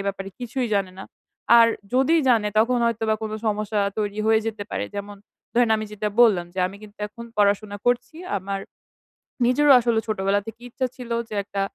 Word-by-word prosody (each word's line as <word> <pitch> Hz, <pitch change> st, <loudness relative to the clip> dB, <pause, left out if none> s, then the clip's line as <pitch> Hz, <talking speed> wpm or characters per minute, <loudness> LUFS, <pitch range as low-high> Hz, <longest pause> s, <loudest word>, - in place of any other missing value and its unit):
ব্যাপারে 195 Hz, 0 st, -3 dB
কিছুই 245 Hz, 0 st, -2 dB
জানে 195 Hz, -2 st, 0 dB
না। 190 Hz, -, -7 dB, 0.5 s
আর 230 Hz, -, +8 dB, 0.3 s
যদি 265 Hz, +5 st, +3 dB
জানে 225 Hz, -4 st, +3 dB
তখন 245 Hz, +3 st, +3 dB
হয়তোবা 225 Hz, -1 st, 0 dB
কোনো 215 Hz, 0 st, -3 dB
সমস্যা 210 Hz, 0 st, 0 dB, 0.2 s
তৈরি 205 Hz, 0 st, -2 dB
হয়ে 220 Hz, 0 st, +4 dB
যেতে 220 Hz, -2 st, -3 dB
পারে। -, -, -2 dB
যেমন, 205 Hz, 0 st, -6 dB, 0.4 s
ধরেন 240 Hz, -1 st, +3 dB
আমি 215 Hz, -, -3 dB
যেটা 210 Hz, 0 st, -2 dB
বললাম 195 Hz, -8 st, +5 dB
যে -, -, -7 dB
আমি 190 Hz, +2 st, -8 dB
কিন্তু 210 Hz, 0 st, -14 dB
এখন 235 Hz, +3 st, -11 dB
পড়াশোনা 205 Hz, 0 st, +1 dB
করছি, 245 Hz, +4 st, 0 dB, 0.2 s
আমার 195 Hz, 0 st, -4 dB, 0.9 s
নিজেরও 280 Hz, +4 st, +4 dB
আসলে 235 Hz, -2 st, +1 dB
ছোটবেলা 200 Hz, -1 st, +1 dB
থেকে 225 Hz, +1 st, -8 dB
ইচ্ছা 255 Hz, +1 st, -2 dB
ছিল 250 Hz, -3 st, -9 dB, 0.2 s
যে 215 Hz, -, -5 dB
একটা, 200 Hz, -1 st, -3 dB
215 Hz, 180 wpm, -23 LUFS, 205-235 Hz, 0.9 s, আর